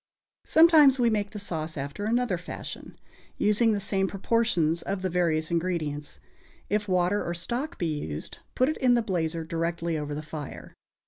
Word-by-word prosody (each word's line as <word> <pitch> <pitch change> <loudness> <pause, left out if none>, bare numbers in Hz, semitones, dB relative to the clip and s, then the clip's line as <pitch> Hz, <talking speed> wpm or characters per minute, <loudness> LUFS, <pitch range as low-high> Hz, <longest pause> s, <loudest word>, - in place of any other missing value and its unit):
Sometimes 315 -5 +7
we 240 -2 +3
make 205 -2 0
the 210 - -7
sauce 160 -5 -4
after 140 +9 -4
another 230 -5 +1
fashion, 180 - -8 0.4
using 215 +2 +3
the 210 - 0
same 195 0 0
proportions 190 -5 +1
of 195 -1 -3
the 185 - -1
various 165 -3 +1
ingredients. 160 -4 -2 0.5
If 210 0 +1
water 185 +2 +1
or 170 - -3
stock 240 - -3
be 160 -4 -1
used, 75 - -6 0.2
put 255 - +3
it 310 - -1
in 250 -2 +4
the 235 - +2
blazer 165 -5 -1
directly 165 0 -2
over 150 0 -4
the 155 - -5
fire. 150 -2 -8
180 Hz, 170 wpm, -27 LUFS, 160-215 Hz, 0.5 s, Sometimes